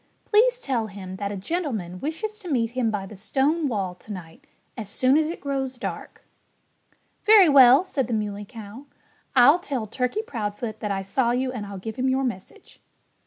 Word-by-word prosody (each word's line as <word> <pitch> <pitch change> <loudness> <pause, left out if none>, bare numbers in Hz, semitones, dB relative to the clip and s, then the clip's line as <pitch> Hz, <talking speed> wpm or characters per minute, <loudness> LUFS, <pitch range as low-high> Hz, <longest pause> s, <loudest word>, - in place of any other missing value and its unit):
"Please - - +3
tell 245 - -1
him 190 -2 -8
that 200 0 -3
a 205 - -4
gentleman 210 - -3
wishes 425 - -4
to 370 -5 -8
meet 235 -5 0
him 245 -2 0
by 205 -3 -3
the 210 - -11
stone 285 - 0
wall 195 -7 -2
to 180 +4 -13
night, 170 -5 -10 0.3
as 220 -4 -7
soon 255 +5 +2
as 310 0 +2
it 340 - -5
grows 270 -2 -3
dark." - - -7 1.0
"Very 425 -4 +7
well!" 275 +2 +7
said 270 -9 -2
the 240 - -3
Muley 210 -1 -3
Cow. 225 +3 -10 0.5
"I'll 265 +7 +7
tell 270 -9 -3
Turkey 250 - -2
Proudfoot 220 - -5
that 210 - -3
I 195 -1 -2
saw 235 +6 0
you 255 +2 0
and 220 -5 -6
I'll 200 -1 -7
give 220 +3 -7
him 260 +1 +1
your 265 +1 +1
message." 210 -7 -7
245 Hz, 190 wpm, -24 LUFS, 205-280 Hz, 1.0 s, Very